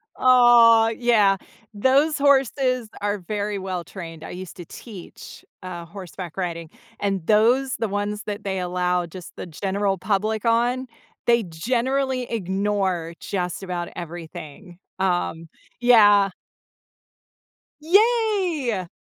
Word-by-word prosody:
Aw, 240 -3 +6
yeah. 215 -5 +3 0.4
Those 275 +8 +2
horses 265 -4 +2
are 205 0 -1
very 205 +2 -3
well 185 -2 -4
trained. 165 -4 -9
I - - -8
used 185 +1 -8
to 175 - -8
teach, 200 0 -11 0.2
uh, 175 -2 -7
horseback 185 -1 -9
riding, 170 -3 -4 0.3
and 195 -4 -2
those 245 +5 +3
the 225 0 -1
ones 205 +1 -3
that 205 0 -5
they 190 -1 -2
allow 180 0 0
just 175 +1 -11
the - - -7
general 195 +3 -2
public 210 +3 -1
on, 245 +3 +1 0.4
they 235 -1 +4
generally 255 +9 -1
ignore 190 -4 -1
just 180 -2 -3
about 180 -2 -4
everything. 170 +1 -9 0.2
Um, 175 -3 -1 0.3
yeah. 205 -5 +6 1.5
Yay. 365 - +2
205 Hz, 115 wpm, -23 LUFS, 180-240 Hz, 1.5 s, Aw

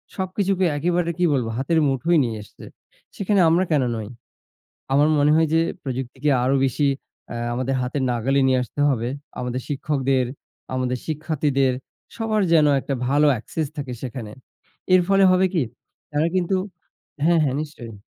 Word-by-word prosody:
সবকিছুকে 190 0 0
একেবারে 170 +2 0
কি 180 - +2
বলব? 125 -4 0
হাতের 160 +5 +1
মুঠোয় 150 +6 +2
নিয়ে 115 -2 -3
আসছে। - - -14 0.5
সেখানে 200 0 +1
আমরা 175 +3 +3
কেন 145 -4 +3
নই? 110 -2 -5 0.9
আমার 145 +2 +5
মনে 145 +1 +4
হয় 160 0 +3
যে, 165 - +4 0.2
প্রযুক্তিকে 130 +2 -3
আরও 135 +2 +2
বেশি 135 +3 -1 0.5
আ - - -5 0.2
আমাদের 130 +2 -1
হাতের 130 +2 -2
নাগালে 125 +4 +1
নিয়ে 130 -1 +3
আসতে 135 - -10
হবে। 120 -3 0 0.3
আমাদের 125 +1 -3
শিক্ষকদের, 135 -2 0 0.5
আমাদের 125 -1 -1
শিক্ষার্থীদের, 145 -4 0 0.4
সবার 220 -2 0
যেন 155 -2 +6
একটা 140 - -4
ভালো 145 +2 +3
একসেস 155 +6 -3
থাকে 135 -3 -4
সেখানে। 115 -4 -6 0.6
এর 185 - +7
ফলে 195 0 +5
হবে 185 +1 +4
কি? 165 -6 +2 0.5
তারা 150 +3 +1
কিন্তু 185 +1 +1 0.7
হ্যা, 170 +1 +4
হ্যা, 135 - 0
নিশ্চয়ই। 120 -7 -8
145 Hz, 155 wpm, -22 LUFS, 130-170 Hz, 0.9 s, এর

